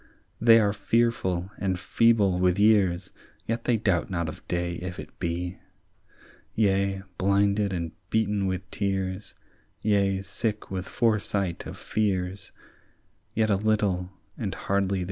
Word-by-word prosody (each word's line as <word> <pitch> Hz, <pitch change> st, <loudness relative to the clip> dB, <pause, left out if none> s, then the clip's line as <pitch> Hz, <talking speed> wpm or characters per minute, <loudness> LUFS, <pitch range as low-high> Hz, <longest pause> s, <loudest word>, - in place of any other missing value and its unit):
"They 115 Hz, 0 st, +8 dB
are 100 Hz, -2 st, +2 dB
fearful 105 Hz, -6 st, 0 dB
and 95 Hz, -2 st, 0 dB
feeble 100 Hz, -2 st, +3 dB
with 90 Hz, 0 st, +3 dB
years, 100 Hz, -4 st, +3 dB, 0.3 s
Yet 115 Hz, +1 st, -2 dB
they 120 Hz, -2 st, +3 dB
doubt 100 Hz, -4 st, +1 dB
not 85 Hz, -3 st, -1 dB
of -, -, -9 dB
day 85 Hz, 0 st, -1 dB
if 90 Hz, 0 st, -6 dB
it -, -, -10 dB
be; 90 Hz, +2 st, -3 dB, 1.0 s
Yea, 100 Hz, -2 st, +1 dB, 0.2 s
blinded 100 Hz, +1 st, +2 dB
and 85 Hz, -3 st, -3 dB, 0.2 s
beaten 105 Hz, -3 st, +1 dB
with 95 Hz, 0 st, -3 dB
tears, 95 Hz, 0 st, -2 dB, 0.5 s
Yea, 100 Hz, -2 st, +2 dB
sick 105 Hz, +2 st, -3 dB
with 95 Hz, -1 st, -3 dB
foresight 105 Hz, -5 st, 0 dB
of -, -, -8 dB
fears, 95 Hz, -2 st, -2 dB, 0.8 s
Yet 110 Hz, -1 st, +2 dB
a -, -, +4 dB
little, 100 Hz, -4 st, +1 dB, 0.3 s
and 100 Hz, -5 st, -3 dB
hardly, 100 Hz, -1 st, 0 dB
they -, -, +2 dB
see. -, -, -1 dB
100 Hz, 140 wpm, -27 LUFS, 90-105 Hz, 1.0 s, They